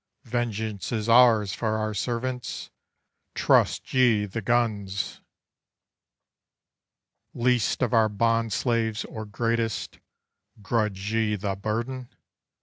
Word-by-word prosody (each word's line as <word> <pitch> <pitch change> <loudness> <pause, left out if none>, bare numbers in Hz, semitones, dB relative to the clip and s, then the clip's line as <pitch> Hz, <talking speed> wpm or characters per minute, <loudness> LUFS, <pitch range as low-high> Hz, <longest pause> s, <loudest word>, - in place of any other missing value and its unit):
Vengeance 110 -4 -3
is 110 -2 -2
ours 115 -4 +5
for 110 -1 -1
our 110 0 -2
servants. 125 +4 -3 0.6
Trust - - +2
ye 120 -5 +4
the 105 +3 -5
guns! 100 -4 -1 2.1
Least 125 0 +1
of 125 - 0
our 110 -2 +4
bond 115 +2 +1
slaves 115 -1 0
or 110 -1 -7
greatest, 115 +1 -2 0.6
grudge 105 -2 -1
ye 110 -2 +1
the 100 -1 -2
burden? 120 +5 -3
110 Hz, 100 wpm, -26 LUFS, 105-120 Hz, 2.1 s, ours